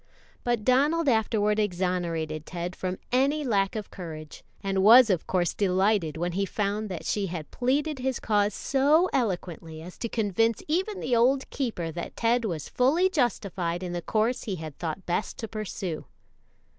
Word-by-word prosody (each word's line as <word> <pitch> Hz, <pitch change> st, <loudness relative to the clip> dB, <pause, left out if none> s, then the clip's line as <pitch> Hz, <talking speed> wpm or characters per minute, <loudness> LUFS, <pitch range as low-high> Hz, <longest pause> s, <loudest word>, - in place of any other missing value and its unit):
But 240 Hz, -3 st, 0 dB
Donald 290 Hz, +6 st, +3 dB
afterward 215 Hz, -3 st, +2 dB
exonerated 175 Hz, -5 st, -1 dB
Ted 175 Hz, +1 st, -4 dB
from 185 Hz, 0 st, -3 dB
any 275 Hz, +4 st, +2 dB
lack 200 Hz, -6 st, +1 dB
of 215 Hz, -2 st, -5 dB
courage, 155 Hz, -4 st, -8 dB, 0.2 s
and 195 Hz, -1 st, 0 dB
was 230 Hz, +3 st, +8 dB
of 180 Hz, -4 st, -1 dB
course 175 Hz, -3 st, +1 dB
delighted 190 Hz, -4 st, +1 dB
when 175 Hz, +2 st, -1 dB
he 195 Hz, +3 st, -1 dB
found 210 Hz, +1 st, -2 dB
that 180 Hz, -3 st, -6 dB
she 205 Hz, -2 st, 0 dB
had 165 Hz, -3 st, -6 dB
pleaded 280 Hz, +3 st, 0 dB
his 260 Hz, 0 st, -1 dB
cause 205 Hz, -1 st, +2 dB
so 295 Hz, +7 st, +3 dB
eloquently 175 Hz, -, -2 dB
as 175 Hz, +3 st, -11 dB
to 230 Hz, -, -3 dB
convince 225 Hz, +1 st, +1 dB
even 380 Hz, +6 st, -1 dB
the 245 Hz, -, +1 dB
old 260 Hz, +3 st, +3 dB
keeper 215 Hz, -11 st, -2 dB
that 170 Hz, +2 st, -6 dB
Ted 235 Hz, +1 st, +1 dB
was 165 Hz, -8 st, -3 dB
fully 320 Hz, +9 st, +2 dB
justified 190 Hz, -, -1 dB
in 175 Hz, -1 st, -4 dB
the 175 Hz, -, -2 dB
course 220 Hz, +7 st, 0 dB
he 200 Hz, -, -2 dB
had 155 Hz, -4 st, -7 dB
thought 175 Hz, +2 st, -5 dB
best 175 Hz, +4 st, -2 dB
to 225 Hz, -, -5 dB
pursue. 195 Hz, -6 st, -5 dB
205 Hz, 170 wpm, -27 LUFS, 175-245 Hz, 0.2 s, was